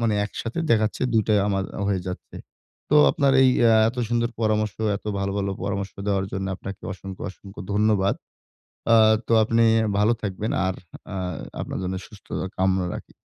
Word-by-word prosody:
মানে, 115 -2 +1
একসাথে 115 +7 -5
দেখাচ্ছে 110 0 +2
২ 110 -1 +4
টাই 105 -1 +4
আমার 95 -1 0
আ - - -4
হয়ে 95 -2 +1
যাচ্ছে। 90 - -8 0.5
তো 150 - +5
আপনার 140 -2 +2
এই 130 - +6
অ্যা 115 -1 +6
এত 120 - -6
সুন্দর 120 0 0
পরামর্শ, 110 -2 +1 0.2
এত - - -13
ভালো, 100 0 -1
ভালো 100 0 -1
পরামর্শ 100 0 -3 0.2
দেওয়ার 95 -1 +1
জন্য, 95 0 -2
আপনাকে 100 0 -8
অসংখ্য, 95 0 -9
অসংখ্য 100 +1 -12
ধন্যবাদ। 105 -2 +2 0.8
আ - - +8 0.3
তো 115 - +2
আপনি 115 +1 +2 0.2
আ - - -1
ভালো 110 +3 +4
থাকবেন 105 +1 -3 0.2
আর 95 - -1 0.4
আ - - -4 0.5
আপনার - - -5
জন্য 95 +1 -2
সুস্থতা 100 -3 -6
কামনা 95 -1 +2
রাখি। - - -10
105 Hz, 175 wpm, -24 LUFS, 95-110 Hz, 0.8 s, আ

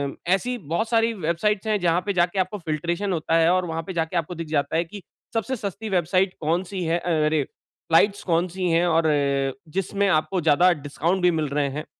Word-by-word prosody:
अ, 175 - -5
ऐसी 245 +6 -1
बहुत 175 +5 -2
सारी 230 0 +2
वेबसाइट्स 195 +3 -1
हैं, 210 -2 +1
जहाँ 175 0 +2
पे 200 - 0
जाके 175 +1 +1
आपको 185 +3 -1
फिल्ट्रेशन 170 +5 -2
होता 165 0 0
है 165 0 +4
और 185 0 +1
वहाँ 165 -1 -3
पे 190 - -4
जाके 165 +1 -1
आपको 170 +2 -2
दिख 165 -1 -6
जाता 150 0 -1
है, 170 - +2
कि 200 +3 -10 0.3
सबसे 225 +4 -1
सस्ती 205 0 -5
वेबसाइट 185 +1 +1
कौन-सी 175 +4 -1
है, 170 +2 +1
अ, 175 - -4 0.2
अरे! 155 -2 +2 0.5
फ्लाइट्स 200 +5 +4
कौन-सी 180 +1 0
हैं 170 +2 +3
और 165 -1 +2
अ, 140 -2 +1 0.3
जिसमें 200 +1 0
आपको 180 +1 +1
ज़्यादा 165 +4 +4
डिस्काउंट 170 +6 -1
भी 180 0 +4
मिल 155 -2 -1
रहे 140 -1 0
हैं। 150 +3 -5
175 Hz, 210 wpm, -24 LUFS, 160-195 Hz, 0.5 s, है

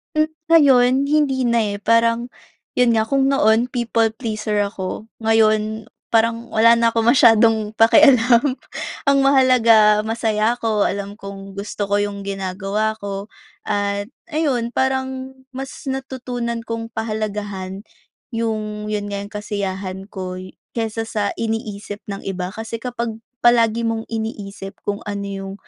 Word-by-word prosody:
Mm, 310 0 +2 0.2
ngayon 275 -7 +6 0.2
hindi 280 -4 +2
na, 235 -1 +2 0.2
eh, - - -5
parang, 230 +2 +2 0.5
’yon 245 -2 +4
nga, 220 - +3
kung 270 +3 +1
noon 235 -3 +3
people 230 -2 +1
pleaser 215 -3 -1
ako, 200 +2 -5
ngayon, 220 0 +2 0.2
parang 230 +1 +1
wala 230 +1 +5
na 230 - +4
akong 230 +1 +3
masyadong 225 -3 +4
pakialam. 250 +1 +5 0.5
Ang 280 -2 +3
mahalaga 240 -6 +5
masaya 225 0 +1
ako, 220 -3 +1
alam 200 +2 -5
kong 195 0 -9
gusto 205 0 -4
ko 205 0 +2
’yong 200 -1 -3
ginagawa 195 +2 -2
ko, 200 0 -5 0.4
at 205 0 -1 0.2
ayun, 265 -7 0
parang 265 0 -2 0.2
mas 270 +1 -7
natutunan 250 -3 -4
kong 230 0 -4
pahalagahan 205 -3 -4 0.5
’yong, 215 -2 -3
’yon 205 -1 -3
nga, 200 - -3
’yong 200 +1 -8
kasiyahan 195 -2 -4
ko 185 -2 -6
y 185 0 -11 0.2
kaysa 225 0 -2
sa 205 -2 -1
iniisip 215 -2 -4
ng 200 -1 -6
iba. 185 -1 -4
Kasi 225 +1 -5
kapag 235 -2 -4 0.2
palagi 235 -1 +4
mong 225 -1 -1
iniisip 205 -3 -6
kung 205 0 -2
ano 200 -1 -4
’yong, 195 -1 -6
220 Hz, 135 wpm, -20 LUFS, 205-235 Hz, 0.5 s, ngayon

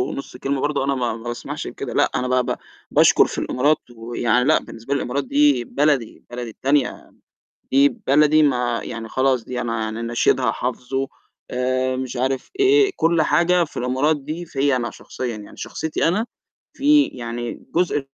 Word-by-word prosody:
نُصّ 135 -2 -7
كلمة 135 +1 -2
برضه 145 -2 0
أنا 140 0 0
ما 120 -3 -1
ما 115 - -10
باسمحش 120 0 -5
بكده. - - -6
لأ، - - +2
أنا 125 - 0
ب 125 - -3
ب - - 0 0.4
باشكر - - +6
في - - -7
الإمارات 145 +4 +2 0.2
ويعني 120 +2 0
لأ 155 +2 +4
بالنسبة 115 +5 -6
لي - - +2
الإمارات 140 +3 -2
دي 140 -2 +3
بلدي، 140 -3 0
بلدي 120 -1 -5
التانية، 135 +2 -1 0.6
دي 140 +2 +5
بلدي 150 +4 +3
ما 125 -4 +1
يعني 115 -1 -6
خلاص 130 -2 +1
دي 125 +1 -4
أنا 115 -2 -2
يعني 110 +1 -3
نشيدها 120 +1 +2
حافظُه 130 +2 -3 0.4
آآ، 130 +1 0
مش 130 -1 -4
عارف 130 +1 -1
إيه، 405 0 +5
كُلّ 165 0 +2
حاجة 175 +3 +3
في 160 - -8
الإمارات 130 +5 +1
دي 155 +5 -6
فيَّ 140 -3 +1
أنا 120 -2 -1
شخصيًا، 125 -3 -6
يعني 105 - -12
شخصيتي 160 0 -2
أنا 200 +7 +1 0.5
في 290 +1 +5
يعني 120 -1 -6
جزء 170 -4 +2
130 Hz, 170 wpm, -21 LUFS, 120-150 Hz, 0.6 s, باشكر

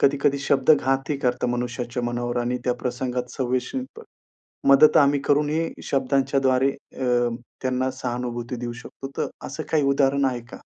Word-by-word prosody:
कधी-कधी 140 0 +3
शब्द 140 0 +2
घातही 135 0 +2
करतात 125 -2 0
मनुष्याच्या 125 0 -3
मनावर 120 0 -2
आणि 125 +1 -1
त्या 125 - +1
प्रसंगात 125 0 -2
संवेशील 130 - -1
पण 455 - -9 0.7
मदत 140 +3 +7
आम्ही 140 -2 +5
करूनही 150 +3 +2 0.2
शब्दांच्याद्वारे 135 0 +2
अ, 125 -3 -1 0.3
त्यांना 130 0 0
सहानुभूती 125 -1 -4
देऊ 120 0 -4
शकतो. 120 +3 -9
तर - - 0 0.2
असं 145 +4 -5
काही 155 -2 +3
उदाहरण 140 0 +2
आहे 125 -2 -1
का? 120 0 -12
130 Hz, 145 wpm, -24 LUFS, 125-140 Hz, 0.7 s, मदत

